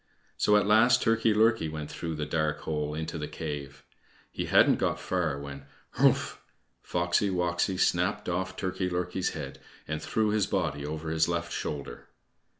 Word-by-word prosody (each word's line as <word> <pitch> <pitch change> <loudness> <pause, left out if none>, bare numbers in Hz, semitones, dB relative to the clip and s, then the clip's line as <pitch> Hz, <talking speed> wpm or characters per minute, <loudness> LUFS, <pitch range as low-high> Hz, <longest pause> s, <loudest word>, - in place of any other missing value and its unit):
So 105 - +4
at 105 - +2
last 110 +4 +5
Turkey 115 -1 +3
lurkey 110 -5 +3
went 75 -1 -6
through 80 -1 -4
the 75 0 -3
dark 75 -1 -1
hole 75 -1 -2
into 80 +1 -4
the 75 - -3
cave. 70 -2 -6 0.5
He - - -3
hadn't - - +5
got - - 0
far 85 -6 -1
when 70 -1 -8 0.3
"Hrumph!" - - +3 0.4
Foxy 85 +3 +1
woxy 90 0 0
snapped 90 -1 +1
off 95 +1 -2
Turkey 95 0 -2
lurkey's 90 +1 -2
head 70 -3 -7 0.3
and 80 0 -3
threw 110 +7 0
his 105 -1 +1
body 80 -7 -1
over 80 +2 -4
his 80 0 +2
left 85 0 -2
shoulder. 70 -5 -5
85 Hz, 160 wpm, -28 LUFS, 75-95 Hz, 0.5 s, last